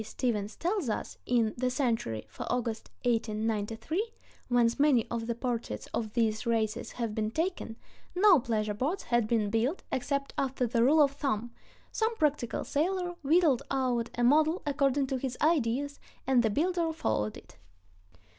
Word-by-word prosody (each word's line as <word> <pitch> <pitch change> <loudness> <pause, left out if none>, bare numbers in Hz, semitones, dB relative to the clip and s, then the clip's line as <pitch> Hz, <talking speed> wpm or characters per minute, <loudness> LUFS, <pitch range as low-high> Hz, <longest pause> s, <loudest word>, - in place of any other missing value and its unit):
P. - - -5
Stephens 215 -2 -2
tells 355 - -1
us 215 - -4
in 230 -3 +2
"The 255 +1 +1
Century" 230 - -1
for - - -6
August, 235 -2 -2 0.2
1893, 225 - -1 0.4
whence 240 0 +2
many 280 -6 +4
of 230 -1 -2
the 235 - -1
portraits 240 -1 -3
of 215 -2 -2
these 220 -2 +1
racers 225 -1 -1
have 230 -3 -3
been 215 0 -1
taken, 320 -4 -2 0.4
no 370 -3 +6
pleasure 215 -3 -1
boats 285 - -2
had 240 -2 +1
been 215 -3 +1
built 240 - 0
except 275 +2 -2
after 265 -1 0
the 235 0 +2
rule 300 +4 +6
of 280 - +2
thumb—some 280 - -3
practical 295 - 0
sailor 355 +4 -1
whittled 305 -3 +3
out 250 -3 0
a 240 - +1
model 310 +7 +4
according 280 -1 +2
to 265 0 -2
his 255 -1 -4
ideas, 285 -2 +1 0.3
and 260 -2 +4
the 225 - +2
builder 335 - +1
followed 110 - -1
it. - - -16
245 Hz, 155 wpm, -30 LUFS, 225-295 Hz, 0.4 s, no